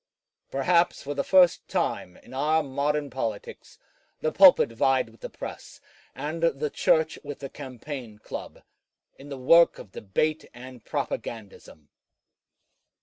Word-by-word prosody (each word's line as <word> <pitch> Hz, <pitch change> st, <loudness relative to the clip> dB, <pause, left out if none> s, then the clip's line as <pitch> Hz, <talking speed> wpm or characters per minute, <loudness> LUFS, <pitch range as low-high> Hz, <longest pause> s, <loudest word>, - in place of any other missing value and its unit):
Perhaps 170 Hz, +6 st, +1 dB
for 145 Hz, -, -4 dB
the 140 Hz, -, -1 dB
first 180 Hz, -2 st, +4 dB
time 90 Hz, -, -2 dB
in -, -, -16 dB
our 155 Hz, +4 st, +1 dB
modern 145 Hz, +1 st, -1 dB
politics, 115 Hz, -5 st, -6 dB, 0.4 s
the 155 Hz, -, -1 dB
pulpit 185 Hz, -10 st, +7 dB
vied 130 Hz, 0 st, +1 dB
with 115 Hz, -, -22 dB
the -, -, -6 dB
press, -, -, -9 dB, 0.4 s
and 155 Hz, +3 st, -5 dB
the 150 Hz, -3 st, 0 dB
Church 160 Hz, 0 st, +2 dB
with 145 Hz, -1 st, -7 dB
the 135 Hz, -1 st, -7 dB
campaign 130 Hz, -4 st, -8 dB
club, -, -, -9 dB, 0.6 s
in 140 Hz, +1 st, -12 dB
the 140 Hz, -, -6 dB
work 165 Hz, +7 st, +5 dB
of 95 Hz, -, -12 dB
debate 155 Hz, +13 st, -1 dB
and 125 Hz, -1 st, -11 dB
propagandism. 100 Hz, -9 st, -6 dB
140 Hz, 135 wpm, -26 LUFS, 125-155 Hz, 0.6 s, pulpit